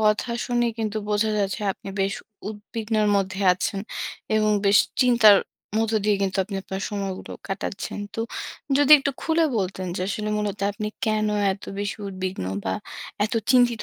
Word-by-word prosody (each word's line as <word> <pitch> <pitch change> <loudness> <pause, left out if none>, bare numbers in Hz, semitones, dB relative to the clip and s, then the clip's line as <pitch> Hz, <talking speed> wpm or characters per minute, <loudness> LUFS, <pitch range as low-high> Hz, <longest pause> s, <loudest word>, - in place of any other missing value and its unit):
কথা 215 +2 +2 0.2
শুনে 240 -1 +1
কিন্তু 215 -1 -2
বোঝা 210 +1 +2
যাচ্ছে 200 +2 -1
আপনি 195 - -11
বেশ 195 +2 +1 0.3
উদ্বিগ্নের 215 0 -1
মধ্যে 190 0 -1
আছেন 190 +2 -2 0.5
এবং 215 0 +3 0.2
বেশ 200 +1 +6 0.2
চিন্তার 235 -5 +7 0.4
মধ্য 225 0 +1
দিয়ে 210 -1 +3
কিন্তু 190 0 0
আপনি 195 0 -5
আপনার 190 0 -5
সময়গুলো 195 -2 -4 0.2
কাটাচ্ছেন। 195 +1 -4 0.2
তো 225 - -2 0.6
যদি 290 0 +3
একটু 280 0 -1
খুলে 325 0 +3
বলতেন 185 -1 -2
যে - - -3
আসলে 215 +1 -2
মূলত 210 -1 -2
আপনি 210 +1 -3 0.2
কেন 215 0 +2 0.3
এত 195 - -10
বেশি 205 0 -2
উদ্বিগ্ন, 185 - -4 0.2
বা 95 - 0 0.5
এত 220 - -2 0.2
চিন্তিত 245 -3 +4
210 Hz, 155 wpm, -24 LUFS, 195-220 Hz, 0.6 s, চিন্তার